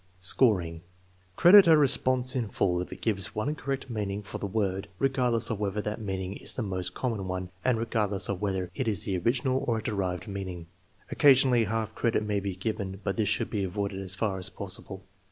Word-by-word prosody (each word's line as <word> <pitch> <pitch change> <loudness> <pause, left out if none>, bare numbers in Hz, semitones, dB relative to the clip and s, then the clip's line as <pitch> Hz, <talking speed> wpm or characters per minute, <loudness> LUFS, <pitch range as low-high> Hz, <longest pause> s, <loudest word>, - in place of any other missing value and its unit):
Scoring. 90 -4 +3 0.5
Credit 190 - +8
a 160 -1 +7
response 130 -3 +3
in 120 -4 -1
full 90 -2 0
if 90 - -7
it - - -9
gives 100 -5 -1
one 110 +8 -1
correct 135 -2 -4
meaning 105 -3 -3
for 100 - -7
the 100 - -3
word, 100 -1 -1
regardless 125 -4 +1
of 110 - -3
whether 105 0 -1
that 105 +1 -4
meaning 95 -1 -4
is - - -2
the 125 - -2
most 95 -3 -3
common 110 -7 -2
one, 90 0 -4
and 125 -3 +2
regardless 105 -4 -1
of 100 -2 -3
whether 95 -3 -2
it 130 -4 -3
is 105 -3 0
the 95 - -2
original 130 +6 +1
or 115 -2 +1
a 110 - -5
derived 95 -3 -2
meaning. 95 -4 -6 0.5
Occasionally 130 -4 +5
half 110 +1 -2
credit 115 -2 0
may 105 -1 0
be 100 -1 -4
given, 95 -1 -4
but 100 0 -1
this 110 -3 0
should 105 - -1
be 100 -2 -1
avoided 100 +1 -3
as 95 -1 -5
far 100 -2 -1
as 95 0 -3
possible. 95 -1 -8
105 Hz, 205 wpm, -28 LUFS, 95-115 Hz, 0.5 s, Credit